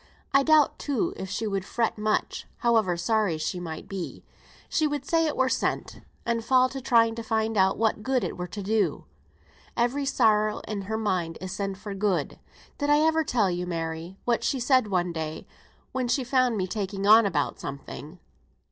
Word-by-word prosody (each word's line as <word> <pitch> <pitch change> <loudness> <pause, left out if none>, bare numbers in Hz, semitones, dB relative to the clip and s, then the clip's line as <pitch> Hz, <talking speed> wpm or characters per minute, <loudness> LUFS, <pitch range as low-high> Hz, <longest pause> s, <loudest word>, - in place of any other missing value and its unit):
I 275 - +6
doubt, 310 0 +4
too, 280 -6 -1
if 190 - -6
she 220 - -2
would 195 -3 -1
fret 230 +3 -1
much, 215 0 -1 0.2
however 220 -7 +3
sorry 205 -2 +1
she 155 +3 -3
might 160 -3 -6
be. 190 -3 -6 0.4
She 310 - +1
would 290 -2 -3
say 330 +1 +2
it 300 - -3
were 260 - +3
sent, - - -2 0.2
and 230 -1 0
fall 255 +1 +4
to 270 0 -6
trying 230 -3 +4
to 230 - -5
find 220 0 -1
out 190 -1 +3
what 220 -1 +1
good 260 +1 0
it - - -3
were 180 0 -5
to 205 +2 -6
do. 215 +2 0 0.7
Every 250 +4 +1
sorrow 215 -4 +2
in 210 -2 -3
her 220 - -1
mind 180 -6 -1
is 185 0 -6
sent 195 0 -3
for 205 0 -7
good. 195 -6 -1 0.4
Did 290 -1 0
I 295 - +6
ever 320 0 +3
tell 220 -10 +1
you, 175 0 -3
Mary, 165 +1 -4
what 235 -1 +1
she 270 - 0
said 255 -1 +3
one 180 -3 0
day 160 -1 -5 0.5
when 260 -1 -1
she 250 +3 +1
found 255 -2 +2
me 185 - 0
taking 195 0 -3
on 215 +1 +7
about 150 -7 -1
something?" 145 +4 -8
215 Hz, 190 wpm, -26 LUFS, 185-250 Hz, 0.7 s, on